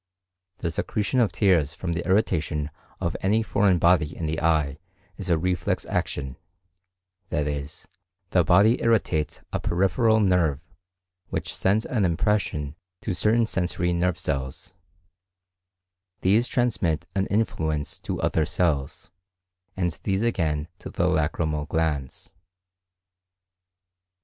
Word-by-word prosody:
The 85 - -2
secretion 105 +7 -1
of 115 -4 +3
tears 85 -8 +2
from 85 -2 -3
the 85 - -2
irritation 80 -7 +1 0.3
of 85 - -2
any 105 +4 +2
foreign 100 -4 +3
body 85 -2 +3
in 85 - -3
the 80 +1 -2
eye 75 -3 +1 0.4
is - - -5
a 85 - +4
reflex 90 +2 -1
action;—that 90 +3 -6
is, 70 0 -5 0.4
the - - +4
body 105 +7 +4
irritates 95 -10 +1
a - - 0
peripheral 110 +5 +2
nerve 90 -8 +2 0.7
which - - -3
sends 105 +4 +1
an 115 -6 0
impression 85 -5 0 0.3
to 105 - -2
certain 110 +7 +2
sensory 90 -3 -1
nerve 90 0 +1
cells; 65 0 -4 1.5
these 110 +6 +3
transmit 90 - 0
an 95 0 0
influence 80 -8 -1
to - - -4
other 80 - +2
cells, 75 -5 -1 0.7
and 90 -3 -1
these 95 +2 0
again 80 -9 0
to - - -8
the - - 0
lacrymal 75 -1 0
glands. 75 -5 -2
90 Hz, 120 wpm, -25 LUFS, 75-100 Hz, 1.5 s, a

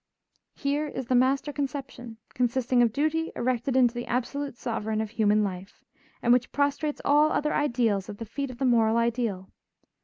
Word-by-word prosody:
Here 290 +2 -1
is 265 -3 -5
the 255 - -1
master 270 +4 +2
conception, 270 -4 -5 0.2
consisting 250 0 +1
of 235 -2 +3
duty 310 +6 0
erected 250 +1 -1
into 245 -3 +4
the 240 0 -5
absolute 265 +2 -3
sovereign 220 -2 -2
of 220 -1 -3
human 215 -2 +2
life, 190 -1 -6 0.4
and 240 - +5
which 250 0 +1
prostrates 285 +1 -1
all 295 +2 +4
other 300 0 0
ideals 235 -9 0
at 205 - -7
the 230 - -6
feet 275 +5 -4
of 250 - -9
the 265 - -1
moral 230 -2 +3
ideal. 230 -5 -1
245 Hz, 175 wpm, -27 LUFS, 230-280 Hz, 0.4 s, and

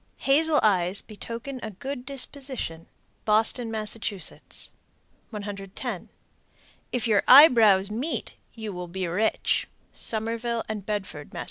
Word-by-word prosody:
Hazel 300 +3 +3
eyes 190 -2 +3
betoken 230 +5 -7
a 220 - -4
good 255 +6 -6
disposition. 265 - -4 0.4
Boston, 225 +2 +2
Mass. 215 -1 -1
110. 205 0 -7 0.8
If 245 -2 -1
your 210 -3 +4
eyebrows 225 -8 +8
meet, 255 +10 -2 0.2
you 220 -3 -5
will 180 0 -6
be 185 +2 -3
rich. 185 +6 +1 0.3
_Somerville 230 +1 -2
and 215 -2 -4
Bedford, 190 -8 -4
Mass. - - -4
220 Hz, 110 wpm, -26 LUFS, 200-245 Hz, 0.8 s, eyebrows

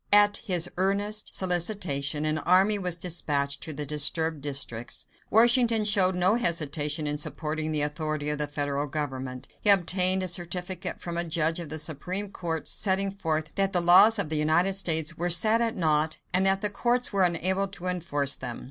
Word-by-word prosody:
At 205 0 +5
his 180 -5 -1
earnest 205 +3 -1
solicitation, 170 -6 0
an 155 0 0
army 190 +6 +2
was 180 -3 +3
dispatched 145 -5 -2
to 160 - -5
the 150 0 -5
disturbed 150 +2 -1
districts. 135 -5 -2 0.2
Washington 235 0 +3
showed 195 -3 +2
no 180 +3 +2
hesitation 155 - -1
in 150 0 -2
supporting 155 +1 -4
the 150 -1 +1
authority 150 0 -3
of 150 - -4
the 150 - -2
federal 145 0 -3
government. 130 -3 -6
He 210 - +4
obtained 185 -1 +5
a - - -3
certificate 180 +1 -3
from 170 -1 -6
a 170 - +1
judge 165 0 -2
of 170 -3 -8
the 155 - -5
Supreme 180 +6 -3
Court, 165 -4 -5
setting 195 -1 +2
forth 160 -5 -3
that 195 0 -1
the 180 - +2
laws 185 +6 +6
of 200 -7 0
the 155 - -2
United 160 +5 +1
States 165 -4 0
were 175 +1 -1
set 215 +6 +3
at 230 -1 -1
naught 155 -2 0 0.2
and 190 +1 +2
that 195 0 +1
the 210 - -1
courts 245 +3 0
were 195 - +1
unable 185 +3 +1
to 190 -2 -9
enforce 145 -6 -1
them. 125 -2 -7
170 Hz, 185 wpm, -26 LUFS, 150-195 Hz, 0.2 s, laws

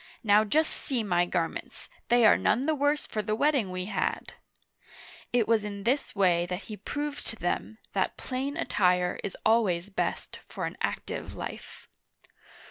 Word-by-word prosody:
Now 210 -1 +5
just 310 +9 +2
see 255 -6 -2
my 175 -3 +2
garments, 170 -2 -3 0.2
they 240 -1 +5
are 215 - +8
none 255 - +2
the 315 - +2
worse 290 0 +1
for 215 - -2
the 215 +1 -1
wetting 275 -5 +2
we 185 0 -4
had! 210 - -2 0.5
" - - -19
It 240 -3 +2
was 225 -2 +3
in 200 -1 -5
this 255 +4 0
way 175 -3 +3
that 180 +2 -4
he 215 - -7
proved 290 +7 -4
to - - -4
them 215 +3 -2 0.2
that - - 0
plain 270 +3 -3
attire 180 - +2
is 200 - -5
always 205 -5 +3
best - - -2
for - - -4
an - - -4
active - - -3
life. - - -8
215 Hz, 170 wpm, -28 LUFS, 185-260 Hz, 0.5 s, are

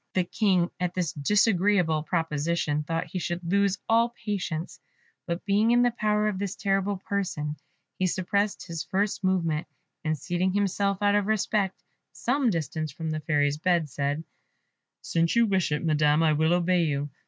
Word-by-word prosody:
The 185 - +3
King, 180 -2 +1
at 180 0 -2
this 180 -4 -1
disagreeable 185 -1 +2
proposition, 155 -1 -1
thought 165 +2 -2
he 185 - -5
should 175 +1 -3
lose 200 +3 +1
all 230 +1 +4 0.2
patience, 180 -5 -3 0.5
but 170 0 -3
being 205 +3 +3
in 240 +1 +5
the 245 - +3
power 210 -2 +1
of 200 -3 -2
this 200 -1 -3
terrible 195 0 0
person 180 -6 -3 0.4
he 185 - +2
suppressed 200 +3 -1
his 165 -3 -5
first 200 +1 -1
movement, 170 -4 0 0.4
and 155 0 0
seating 180 +3 -1
himself, 200 0 0
out 205 0 +4
of 205 -1 +2
respect, 210 -2 0 0.3
some 260 0 +1
distance 155 - -2
from 160 +2 -4
the 155 - -2
Fairy's 145 -1 +1
bed, 170 -3 +1
said, 145 +3 -2 0.8
"Since 165 +3 +1
you 235 0 +5
wish 190 -6 +1
it, 150 +3 -1
Madam, 150 0 +3
I 155 -1 +4
will 160 +3 +3
obey 180 0 +2
you. 145 -1 -2
180 Hz, 165 wpm, -27 LUFS, 160-200 Hz, 0.8 s, in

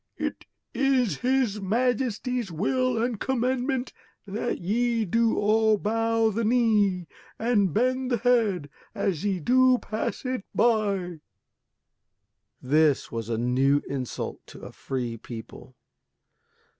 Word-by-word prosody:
It - - -4 0.3
is 265 -5 +1
his 250 -5 0
Majesty's 245 +1 -1
will 250 +8 0
and 235 -3 -2
commandment 260 0 -1 0.3
that 210 +4 -3
ye 230 +4 0
do 230 +4 +1
all 215 +1 +3
bow 225 +1 +1
the 230 +3 -1
knee 210 -6 +2 0.3
and 220 -5 +2
bend 255 - 0
the 240 - +1
head 220 - +1 0.3
as 185 -5 -1
ye 195 -3 0
do 255 +7 +4
pass 220 +3 -4
it 255 -4 -2
by." 200 -7 +1 1.4
This 150 +2 +2
was 115 -1 -4
a 115 - -1
new 130 +4 +2
insult 130 -3 -4
to - - -12
a - - -9
free 120 -3 -4
people. 115 0 -10
220 Hz, 120 wpm, -26 LUFS, 180-245 Hz, 1.4 s, do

